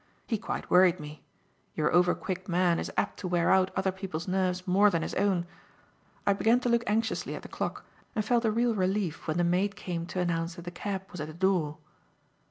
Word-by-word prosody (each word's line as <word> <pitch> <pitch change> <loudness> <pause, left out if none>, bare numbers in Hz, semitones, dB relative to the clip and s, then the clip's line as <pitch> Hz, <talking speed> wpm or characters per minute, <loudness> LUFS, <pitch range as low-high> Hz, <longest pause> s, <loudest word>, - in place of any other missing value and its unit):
He 225 - -1
quite 225 - -5
worried 180 0 +6
me. 150 -1 -9 0.5
Your 150 - +1
over 175 +1 +4
quick 185 -1 -5
man 175 -1 +2
is - - -4
apt 205 - 0
to 190 - -4
wear 175 -1 +2
out 190 0 +4
other 190 0 +1
people's 185 -3 -5
nerves 185 -1 0
more 200 +3 +5
than 170 -4 0
his - - -4
own. 190 -4 +1 0.8
I 200 - +4
began 225 +4 +3
to 245 - 0
look 235 0 +3
anxiously 225 +2 0
at - - -8
the - - -8
clock, - - -4 0.3
and 215 -2 0
felt 240 +1 +2
a - - +4
real 235 +2 +2
relief 190 -4 -1
when 155 +1 0
the 175 - +2
maid 185 +4 +1
came 170 -2 -4
to 180 +1 -4
announce 170 -1 -1
that 175 - -9
the 175 - -6
cab 190 +2 -4
was 180 - -6
at 150 - -4
the 155 - -9
door. 175 -5 +1
185 Hz, 220 wpm, -29 LUFS, 175-200 Hz, 0.8 s, worried